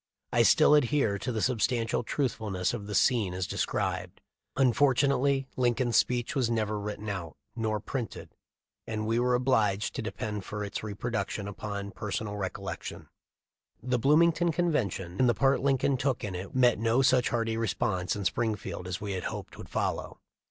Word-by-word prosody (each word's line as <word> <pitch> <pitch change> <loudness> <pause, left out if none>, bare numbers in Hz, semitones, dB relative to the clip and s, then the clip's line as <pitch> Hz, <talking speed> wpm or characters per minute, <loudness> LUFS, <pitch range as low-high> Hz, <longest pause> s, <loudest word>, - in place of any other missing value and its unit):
I 120 - +5
still 150 +6 +6
adhere 140 -7 +3
to 125 - -3
the 110 -3 -1
substantial 115 -2 +1
truthfulness 110 -7 -1
of 105 -4 -5
the 105 - -4
scene 110 -8 +2
as 90 -1 -1
described. - - -2 0.4
Unfortunately 135 +1 +3
Lincoln's 120 -1 +1
speech 120 -1 +1
was 130 -4 +1
never 110 -2 0
written 105 +1 -5
out 95 -6 -4 0.2
nor 110 -2 -1
printed, 115 +2 -5 0.5
and 110 -1 -3
we 115 +2 +1
are 125 0 +3
obliged 110 -6 +1
to - - -3
depend 105 -2 -4
for 105 +2 -5
its 100 0 -4
reproduction 105 -1 -3
upon 100 0 -5
personal 105 0 -4
recollection. 95 -2 -5 0.7
The 125 0 0
Bloomington 165 +5 +4
convention 120 - -1
and 125 - +5
the 120 - +2
part 135 0 +3
Lin 135 0 +3
coln 135 +1 +1
took 130 -1 -1
in 100 -3 -3
it 90 +5 -6
met 125 -4 +4
no 115 +4 +2
such 130 -1 +4
hearty 115 -1 0
response 95 -5 -1
in 100 -2 -4
Springfield 105 -4 -2
as 90 -1 -3
we 100 -2 -3
hoped - - -6
would - - -10
follow. - - -2
115 Hz, 165 wpm, -29 LUFS, 100-130 Hz, 0.7 s, still